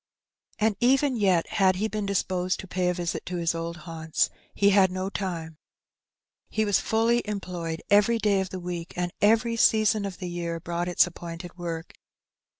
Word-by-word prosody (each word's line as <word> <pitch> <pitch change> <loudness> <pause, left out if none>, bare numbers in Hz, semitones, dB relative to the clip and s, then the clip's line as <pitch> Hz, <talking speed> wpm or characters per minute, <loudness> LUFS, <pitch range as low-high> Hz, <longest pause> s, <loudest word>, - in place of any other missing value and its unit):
And 215 -1 +2
even 265 +2 +3
yet, 190 -6 +3
had 190 -2 +3
he 210 +4 0
been 215 -2 -3
disposed 185 -2 0
to 190 - -11
pay 180 0 0
a - - +1
visit 175 -1 -3
to 180 - -3
his 170 -1 0
old 170 0 -5
haimts, 160 -1 -1 0.2
he 200 0 +4
had 190 -1 +5
no 185 +1 -3
time. 165 -6 -4 0.9
He 220 - 0
was 205 -2 +3
fully 230 +2 +2
employed 180 -6 -4
every 210 +3 +5
day 205 -3 +2
of 190 - -4
the 185 - -6
week, 175 -1 -5
and 175 0 -2
every 225 +2 +3
season 215 -2 +3
of 195 -2 -5
the 180 - -5
year 170 -1 -3
brought 170 +1 -3
its 175 - +4
appointed 170 0 -8
work. 170 -2 -5
185 Hz, 180 wpm, -26 LUFS, 170-210 Hz, 0.9 s, had